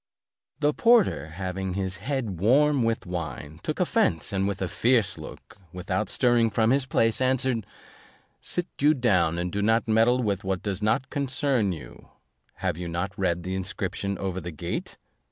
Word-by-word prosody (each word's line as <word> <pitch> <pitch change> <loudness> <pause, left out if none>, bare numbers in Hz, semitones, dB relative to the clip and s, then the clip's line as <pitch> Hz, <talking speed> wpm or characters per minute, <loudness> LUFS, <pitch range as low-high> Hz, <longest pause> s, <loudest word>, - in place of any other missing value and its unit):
The 150 0 +3
porter 230 - +3
having 95 +2 -4
his 95 -1 -2
head 115 - -3
warm 140 +7 +4
with 115 -3 0
wine, 80 -4 -5
took - - -3
offence 80 +4 +1
and 95 0 +1
with 100 -2 -3
a 95 - -1
fierce 115 -2 +2
look, - - -11
without 90 0 -2
stirring 120 -2 +3
from 110 +2 +2
his 135 0 +2
place, 115 -1 +1
answered, 130 -4 +1 0.7
"Sit 175 - -2
you 150 +2 +4
down, 95 - +2
and 90 +1 -2
do 100 - -1
not 115 +2 +2
meddle 115 +3 +3
with 100 -3 -1
what 95 -1 -2
does 100 -1 -3
not 115 +5 0
concern 135 -6 0
you: 75 -9 -10 0.5
have 85 - -2
you 90 - -4
not 85 +4 -3
read 90 -3 0
the 95 +2 -3
inscription 95 +1 -3
over 95 -1 -3
the 85 - -6
gate? 75 -5 -5
100 Hz, 170 wpm, -26 LUFS, 90-125 Hz, 0.7 s, warm